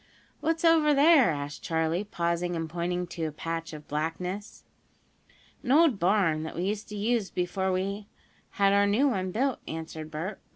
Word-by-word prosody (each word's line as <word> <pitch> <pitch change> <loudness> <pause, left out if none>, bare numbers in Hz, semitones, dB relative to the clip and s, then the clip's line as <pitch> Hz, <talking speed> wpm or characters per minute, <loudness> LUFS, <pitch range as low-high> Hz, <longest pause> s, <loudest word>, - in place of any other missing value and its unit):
"What's 325 +2 0
over 315 -3 +5
there?" 290 -2 +6
asked 145 -2 -4
Charley, 160 +3 0
pausing 175 -3 -2
and 165 -1 -3
pointing 175 +2 -2
to 170 -2 -5
a 155 - -3
patch 165 +2 -5
of 150 -1 -10
blackness. 180 +7 -4 1.0
"An 255 - -2
old 295 -7 +5
barn, 175 -4 +2
that 160 - -6
we 175 - -2
used 205 +2 -3
to 210 - -6
use 220 -1 0
before 185 +1 -1
we 200 +3 -2 0.5
had 200 0 +4
our 200 0 +4
new 230 +8 +3
one 190 -6 -1
built," 260 +6 0
answered 160 -1 -6
Bert. 165 +6 -5
185 Hz, 170 wpm, -28 LUFS, 165-215 Hz, 1.0 s, there